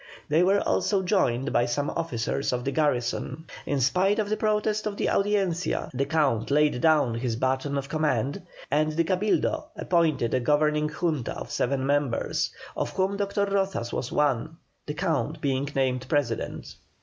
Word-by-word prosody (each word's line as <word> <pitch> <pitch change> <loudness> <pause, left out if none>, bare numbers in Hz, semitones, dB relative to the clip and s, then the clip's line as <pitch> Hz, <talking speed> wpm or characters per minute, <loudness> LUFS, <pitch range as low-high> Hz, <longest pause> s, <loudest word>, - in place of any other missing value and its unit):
They 155 +3 +4
were 195 +3 +4
also 195 -3 +1
joined 135 - +1
by 120 - +3
some 145 +4 -1
officers 140 -4 -2
of 125 -1 -2
the 135 - 0
garrison. 135 0 -1 0.2
In 145 - 0
spite 185 +10 +2
of 210 -2 -1
the 215 - +1
protest 215 0 0
of 205 -1 -4
the - - 0
Audiencia, 195 -4 0
the 135 +2 -1
Count 140 -9 +1
laid 145 -3 +2
down 150 -7 +4
his 115 0 -2
baton 130 +3 0
of 135 0 -3
command, 140 -3 0 0.3
and 155 +2 +2
the 170 +2 +2
Cabildo 210 - 0
appointed 160 -9 +1
a 130 - +3
governing 150 +3 +2
Junta 155 -5 -2
of - - -7
seven 135 +1 0
members, 140 -3 0 0.3
of - - -1
whom 190 +1 0
Dr. 200 0 0
Rozas 195 -12 -1
was 125 - -3
one, 150 +2 0 0.3
the 150 - -3
Count 160 -3 -1
being 140 -1 -1
named 130 -1 0
President. 140 -7 -2
150 Hz, 165 wpm, -26 LUFS, 130-180 Hz, 0.3 s, They